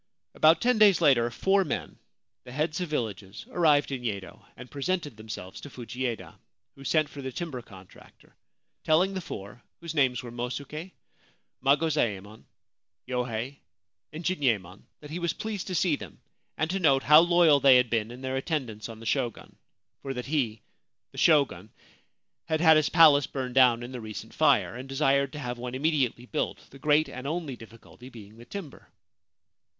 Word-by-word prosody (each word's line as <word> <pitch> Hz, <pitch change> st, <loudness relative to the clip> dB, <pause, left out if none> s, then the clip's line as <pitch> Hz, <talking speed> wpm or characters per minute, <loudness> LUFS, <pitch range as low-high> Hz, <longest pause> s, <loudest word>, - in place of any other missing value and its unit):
About 160 Hz, +2 st, +4 dB
ten 245 Hz, -2 st, +2 dB
days 205 Hz, -4 st, +6 dB
later 130 Hz, -8 st, +4 dB
four 195 Hz, -, +2 dB
men, -, -, -5 dB, 0.4 s
the 125 Hz, -, -12 dB
heads 155 Hz, +6 st, -2 dB
of 180 Hz, -, -3 dB
villages, 105 Hz, -8 st, -4 dB
arrived 150 Hz, -5 st, +3 dB
in 130 Hz, -2 st, -4 dB
Yedo, 100 Hz, -6 st, -5 dB
and 125 Hz, 0 st, -11 dB
presented 145 Hz, -1 st, -2 dB
themselves 105 Hz, -4 st, -8 dB
to 145 Hz, -, -9 dB
Fujieda, 125 Hz, -2 st, -5 dB, 0.3 s
who 135 Hz, -, -14 dB
sent 155 Hz, +1 st, +2 dB
for 145 Hz, -, -10 dB
the 130 Hz, -1 st, -5 dB
timber 145 Hz, -3 st, -5 dB
contractor, 95 Hz, -5 st, -17 dB, 0.5 s
telling 180 Hz, +5 st, +3 dB
the 190 Hz, -, -3 dB
four, 105 Hz, -, -9 dB, 0.2 s
whose 170 Hz, -1 st, -6 dB
names 130 Hz, -5 st, +1 dB
were 120 Hz, -, -8 dB
Mosuke, 140 Hz, +8 st, -6 dB, 0.7 s
Magozaemon, 125 Hz, -9 st, 0 dB, 0.6 s
Yohei, 125 Hz, +1 st, -3 dB, 0.5 s
and 160 Hz, +2 st, -8 dB
Jinyemon, 115 Hz, -, -1 dB, 0.2 s
that 150 Hz, 0 st, -11 dB
he 170 Hz, -, -4 dB
was 170 Hz, -1 st, -1 dB
pleased 215 Hz, -2 st, -5 dB
to 185 Hz, -, -3 dB
see 170 Hz, -2 st, +2 dB
them -, -, -11 dB, 0.4 s
and 155 Hz, +1 st, -1 dB
to 195 Hz, -, -1 dB
note 135 Hz, -6 st, +3 dB
how 150 Hz, +1 st, +8 dB
loyal 170 Hz, -3 st, +5 dB
they 135 Hz, -2 st, +7 dB
had 125 Hz, -2 st, +1 dB
been 110 Hz, -2 st, 0 dB
in 125 Hz, +2 st, -10 dB
their 130 Hz, 0 st, -3 dB
attendance 130 Hz, -8 st, -3 dB
on 110 Hz, -1 st, -9 dB
the -, -, -10 dB
Shogun, 120 Hz, 0 st, -2 dB, 0.5 s
for 135 Hz, -1 st, -5 dB
that 125 Hz, -, -5 dB
he, 120 Hz, -8 st, -1 dB, 0.5 s
the -, -, -8 dB
Shogun, 140 Hz, -, +3 dB, 0.8 s
had 160 Hz, -1 st, -1 dB
had 160 Hz, -1 st, +6 dB
his 155 Hz, -1 st, +3 dB
palace 155 Hz, -4 st, +6 dB
burned 130 Hz, -2 st, -5 dB
down 125 Hz, -2 st, +5 dB
in 120 Hz, -, -7 dB
the 125 Hz, -2 st, -6 dB
recent 110 Hz, -1 st, -8 dB
fire, -, -, +3 dB
and 130 Hz, +2 st, -8 dB
desired 140 Hz, 0 st, +1 dB
to 150 Hz, -, -6 dB
have 125 Hz, -3 st, -5 dB
one 125 Hz, +1 st, -5 dB
immediately 135 Hz, -4 st, 0 dB
built, 150 Hz, +4 st, -4 dB
the 135 Hz, -, -14 dB
great 150 Hz, +2 st, +3 dB
and 130 Hz, +2 st, -7 dB
only 155 Hz, -4 st, -3 dB
difficulty 115 Hz, +2 st, -14 dB
being 110 Hz, -3 st, -13 dB
the 120 Hz, -, -13 dB
timber. 175 Hz, -2 st, -9 dB
135 Hz, 175 wpm, -27 LUFS, 120-155 Hz, 0.8 s, how